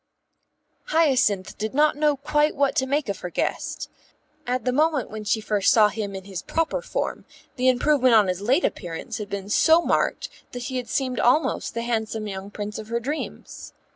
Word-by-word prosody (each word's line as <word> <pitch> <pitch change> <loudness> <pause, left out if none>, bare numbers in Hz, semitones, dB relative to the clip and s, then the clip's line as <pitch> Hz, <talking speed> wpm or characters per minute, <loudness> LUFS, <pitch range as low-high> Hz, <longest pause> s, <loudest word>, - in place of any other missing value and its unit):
Hyacinth 260 - +2
did 220 +3 -3
not 300 +1 +4
know 295 -1 +2
quite 295 +2 +1
what 280 -1 +1
to 265 - +2
make 285 0 0
of 200 -2 -3
her 180 - -5
guest. - - -3 0.6
At 250 +1 -1
the 250 - +2
moment 300 -2 +1
when 215 0 -6
she 210 +2 +1
first 210 -2 +2
saw 215 -2 +6
him 205 -1 -4
in 190 - -6
his 190 -3 -6
proper 330 +9 -1
form - - -3 0.3
the 255 +1 +3
improvement 255 -1 +3
on 210 -3 +5
his 185 +1 -2
late 260 - +2
appearance 170 +1 -4
had 205 -1 -6
been 200 -1 -5
so 320 +10 +5
marked - - 0 0.3
that 245 -1 -5
he 260 +1 -3
had 250 -1 -5
seemed 255 -2 -1
almost 250 -1 +1
the 230 - -2
handsome 220 -2 -2
young 195 -1 -6
Prince 210 +1 -6
of 215 - -8
her 235 +1 -1
dreams. 285 +6 -6
240 Hz, 195 wpm, -24 LUFS, 210-285 Hz, 0.6 s, saw